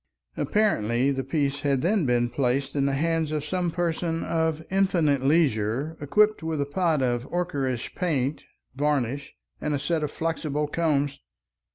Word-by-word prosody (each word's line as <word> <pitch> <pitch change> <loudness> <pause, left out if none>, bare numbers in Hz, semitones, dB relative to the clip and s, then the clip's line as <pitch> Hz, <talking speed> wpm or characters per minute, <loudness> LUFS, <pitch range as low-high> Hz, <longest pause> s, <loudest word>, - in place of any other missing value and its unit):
Apparently 130 - +1
the 135 -1 -2
piece 140 +1 -1
had 140 -2 +1
then 185 -3 +2
been 120 -1 +2
placed 135 +3 -1
in 140 -1 +2
the 140 - 0
hands 160 +1 0
of 150 -1 -2
some 180 +2 -1
person 165 -1 -1
of 160 -1 -1
infinite 175 -8 +2
leisure 135 -1 +1
equipped 210 +9 +3
with 160 -1 -2
a 140 - +1
pot 160 -2 +1
of 120 +1 -1
ocherous 140 -9 -1
paint, 150 -6 -1 0.3
varnish, 140 -1 -1 0.3
and 150 -1 0
a - - -2
set 160 +3 0
of 150 - -1
flexible 155 -2 -2
combs. 145 -3 0
150 Hz, 155 wpm, -26 LUFS, 135-165 Hz, 0.3 s, equipped